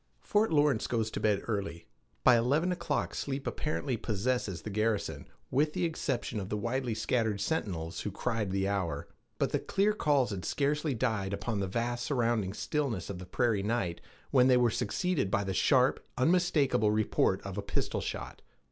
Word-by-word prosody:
Fort 210 -1 +2
Lawrence 145 -6 +3
goes 110 -2 -1
to - - -3
bed 105 -2 +1
early. 100 -6 -3 0.4
By 125 - +7
eleven 140 +10 +2
o'clock 170 -4 -1
sleep 135 0 -3
apparently 145 -4 -2
possessed 110 -3 -1
the 105 - -5
garrison, 110 0 -1 0.2
with 150 +4 +2
the - - 0
exception 135 -8 -2
of 95 -1 -5
the 105 - -1
widely 120 +2 -1
scattered 110 -3 0
sentinels 95 - -2
who - - -3
cried 110 +1 -2
the 95 +1 0
hour. 90 -7 -2 0.3
But - - 0
the - - +1
clear 200 +2 +1
calls 145 - +2
had 95 -3 -4
scarcely 145 0 0
died 110 -5 -1
upon 100 +2 -2
the 95 - -1
vast 120 +4 -2
surrounding 115 -8 0
stillness 115 - -2
of 90 - -7
the 90 - -9
prairie 115 +1 +1
night 100 -5 -1 0.3
when 130 -2 +5
they 130 -1 +6
were 120 -2 +3
succeeded 150 - 0
by 100 +1 +1
the 95 -1 -2
sharp, 130 +4 +3
unmistakable 145 - +3
report 105 -2 +2
of 100 -1 -6
a 100 - -2
pistol 100 - -2
shot. - - -5
115 Hz, 175 wpm, -31 LUFS, 100-135 Hz, 0.4 s, By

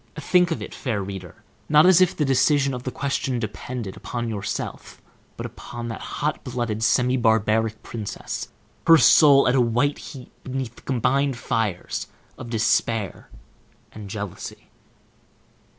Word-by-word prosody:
Think 180 +3 +2
of 165 - -3
it, - - -8
fair 110 -8 -2
reader, 95 -3 -8 0.3
not 150 +2 +6
as 185 -1 +6
if 185 - +3
the 150 - +1
decision 135 +1 +3
of 125 - -4
the 130 - -4
question 135 -1 -2
depended 110 -1 -5
upon 120 -1 -4
yourself, 105 -1 -5 0.4
but - - -5
upon 120 -1 -7
that 115 - -6
hot 150 +1 -3
blooded, 120 -4 -3
semi 125 +3 +3
barbaric 110 -1 +1
princess, 110 -3 -5 0.4
her 165 -1 +9
soul 145 -3 +6
at 125 - +3
a 130 - +4
white 120 +5 +1
heat 130 -3 -10
beneath 130 -2 -4
the - - -16
combined 135 +1 0
fires 110 -7 -2 0.3
of 120 - -9
despair 115 -2 0 0.6
and 105 -2 -9
jealousy. 105 -3 -7
120 Hz, 145 wpm, -23 LUFS, 110-140 Hz, 0.6 s, her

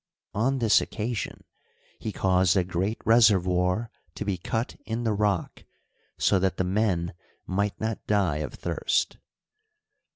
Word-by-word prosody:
On 130 +6 +1
this 115 -4 +4
occasion 115 +1 -4 0.6
he 110 - -4
caused 95 -2 +2
a 95 - +4
great 95 +5 -1
reservoir 100 -2 +3 0.2
to - - -4
be 100 -2 0
cut 115 +5 -3
in 115 +1 -3
the 110 -2 +1
rock, 100 -3 -1 0.5
so 95 - +3
that 95 0 0
the - - +1
men 90 -3 0 0.2
" - - -39
might 100 +2 -1
not 110 0 -3
die 95 -8 +2
of 75 - -4
thirst." - - -1
100 Hz, 140 wpm, -27 LUFS, 90-110 Hz, 0.6 s, this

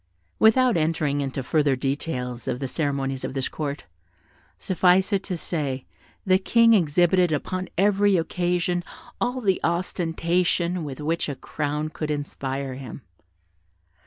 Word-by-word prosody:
Without 235 0 +5
entering 155 -3 0
into 135 -1 -3
further 145 0 +2
details 125 -3 -3
of 125 - -1
the 135 - -2
ceremonies 135 -2 -2
of 135 - -4
this 135 -1 -1
court, 145 -2 -4 0.7
suffice 185 +2 +3
it 195 - +2
to 185 -3 -3
say, 140 -6 -3 0.4
the 185 -1 +4
King 230 +3 +5
exhibited 175 0 +3
upon 185 +5 -2
every 200 0 +4
occasion 175 +1 0 0.4
all 250 +1 0
the 195 -5 +2
ostentation 170 0 0
with 140 -2 -6
which 160 +1 -1
a 140 - -3
crown 150 +2 -3
could 155 0 -5
inspire 140 -2 -3
him. 130 -1 -9
165 Hz, 130 wpm, -24 LUFS, 140-185 Hz, 0.7 s, Without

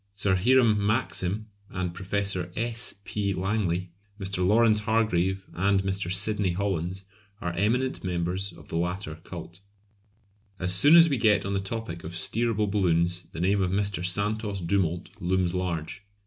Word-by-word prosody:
Sir 100 -1 +1
Hiram 110 0 +4
Maxim 105 -2 0 0.2
and 90 -2 -3
Professor 95 -1 -2
S. 115 +1 -2
P. 100 -2 -1
Langley, 90 -3 -1 0.3
Mr. 95 -2 -2
Lawrence 110 +3 +4
Hargrave, 95 -4 +1
and 95 +2 +2
Mr. 95 -2 -2
Sydney 100 -1 +1
Hollands 95 -1 -2 0.3
are 90 -1 -3
eminent 115 +8 0
members 90 +2 -2
of 85 - -15
the - - -2
latter 90 -2 -3
cult. 85 0 -8 1.0
As 90 0 -1
soon 145 - +6
as 170 0 +9
we 140 -4 0
get 105 -3 +3
on 100 - -2
the 100 - +1
topic 95 -4 -5
of 80 - -7
steerable 110 +4 0
balloons 90 -3 +1
the 80 - -8
name 95 +3 +2
of 90 - +1
Mr. 100 -1 -1
Santos 105 +2 -1
Dumont 90 -1 -1
looms 90 0 +1
large. 90 +1 -3
95 Hz, 150 wpm, -27 LUFS, 90-105 Hz, 1.0 s, as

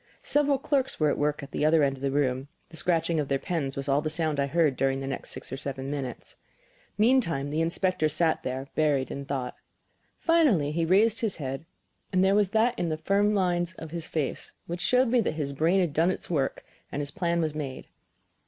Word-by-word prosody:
Several 290 -1 +2
clerks 270 -1 -1
were 150 -2 +3
at - - -2
work 150 0 0
at 140 - -9
the - - -2
other 155 0 +4
end 135 -1 +1
of 130 - -14
the 140 - 0
room; 135 -1 0 0.2
the 165 - -12
scratching 165 -1 +1
of 145 - -1
their 135 - +1
pens 140 -3 -3
was 140 0 -4
all 140 +1 +2
the 155 - -2
sound 155 -2 -1
I 140 - +1
heard 155 -2 +2
during 135 +1 +1
the 135 - -4
next 135 - -4
six - - -6
or - - -3
seven 135 0 -5
minutes. 135 -4 -6 0.6
Meantime 210 - +2
the 155 +2 0
inspector 170 -1 +1
sat 160 +1 +1
there, 130 +1 -4
buried 145 -4 +1
in 140 0 -5
thought. 135 -3 -3 0.6
Finally 280 - +3
he 165 +2 0
raised 210 +7 +3
his 220 -4 0
head, 135 +1 -5 0.5
and 185 0 +3
there 195 - +4
was 205 -2 +3
that 230 +4 +2
in 170 - 0
the 155 - -1
firm 200 +6 +2
lines 175 -2 +1
of 160 -2 -9
his 170 -1 -4
face 150 -4 -3
which 175 +1 -5
showed 250 0 +3
me 245 0 +3
that 155 - -2
his 145 -3 -3
brain 165 +7 +2
had 175 -6 0
done 165 +4 +3
its 185 - -4
work 140 -5 -1 0.3
and 140 - -3
his 145 - +1
plan 170 -2 0
was 155 -2 0
made. 140 -4 -5
155 Hz, 225 wpm, -27 LUFS, 140-185 Hz, 0.6 s, other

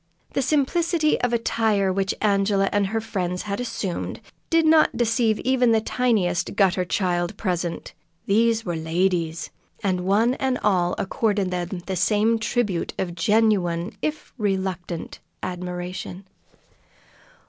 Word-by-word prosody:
The - - +1
simplicity 305 +3 +1
of 245 - +1
attire 220 -4 +1
which 195 0 0
Angela 195 -1 +2
and 205 -1 +2
her 225 +3 -1
friends 180 -4 -3
had 200 0 -3
assumed 205 -7 -3 0.3
did 330 -1 +3
not 315 0 +4
deceive 225 -2 +2
even 250 -2 +3
the 220 - +4
tiniest 215 -7 0
gutter 190 -2 +3
child 180 +1 -1
present 175 -4 -3 0.3
these 225 +2 +2
were 175 -2 -2
"ladies," 165 0 -1 0.3
and 185 -3 0
one 210 +6 +2
and 260 -1 +1
all 180 -4 +2
accorded 200 -1 0
them 175 0 -3
the 190 - -3
same 215 +5 +2
tribute 215 -5 -1
of 175 -2 -2
genuine, 185 -2 +1
if 305 0 -4
reluctant, 190 -4 -3 0.2
admiration. 180 +1 -5
200 Hz, 125 wpm, -24 LUFS, 180-225 Hz, 0.3 s, not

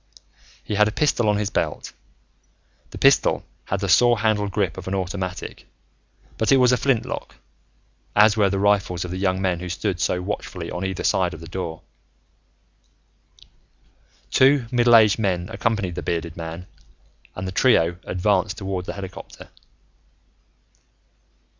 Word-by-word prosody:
He - - -5
had 105 +1 +4
a - - -2
pistol 120 -4 +1
on 105 - +2
his 105 -1 -2
belt. - - -3 1.0
The - - -10
pistol - - +3 0.2
had 95 0 -3
the 100 - -1
saw 120 +6 +5
handle 105 -2 0
grip 100 -4 -1
of 95 -1 -9
an 95 - -2
automatic, 95 0 -5 0.7
but 110 - +1
it 135 - +6
was 125 -1 +4
a 125 - +3
flintlock, 130 -3 -2 0.8
as 105 +1 +6
were 105 -3 +3
the 100 - -1
rifles 95 -3 +1
of 90 - -7
the 90 - -4
young 95 -1 0
men 95 -3 0
who 90 0 -6
stood 90 +1 -2
so 90 - 0
watchfully 90 -2 -5
on 90 - -4
either 95 -1 -3
side 90 -4 +1
of - - -11
the 85 - -10
door. 85 -2 -6 2.5
Two 135 -1 +4
middle 120 -1 +5
aged 110 -1 +5
men 90 -4 -1
accompanied 110 -5 -1
the - - -5
bearded 85 -1 -3
man 80 +1 -7 0.7
and 95 0 -5
the - - -4
trio 85 -6 +3
advanced 100 +2 0
toward 95 -2 -4
the - - -5
helicopter. 95 -2 -10
95 Hz, 155 wpm, -22 LUFS, 90-105 Hz, 2.5 s, it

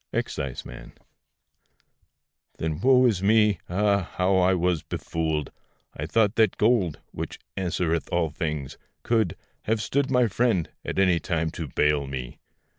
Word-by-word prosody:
EXCISEMAN. 65 -3 -4 1.6
Then 80 -1 -2
woe 130 +1 +5
is 105 -7 +2
me! 105 -2 +4
ah! 100 0 +1
how 95 +1 +2 0.2
was 90 -2 +1
I - - -33
befooled! 80 -3 -2 0.4
I - - -4
thought 110 -3 +2
that 110 -4 +3
gold 105 -8 +2
(which - - -6 0.2
answereth 85 -3 -1
all 85 -3 +1
things) 75 -4 -4 0.2
could 110 -7 +1 0.3
Have 110 +1 +1
stood 135 +5 0
my 125 -2 +4
friend 110 -5 +1
at - - -4
any 90 -3 +4
time 80 -2 -1
to 80 -1 -5
bail 75 +1 +1
me! 65 -3 -6
90 Hz, 135 wpm, -25 LUFS, 80-110 Hz, 1.6 s, woe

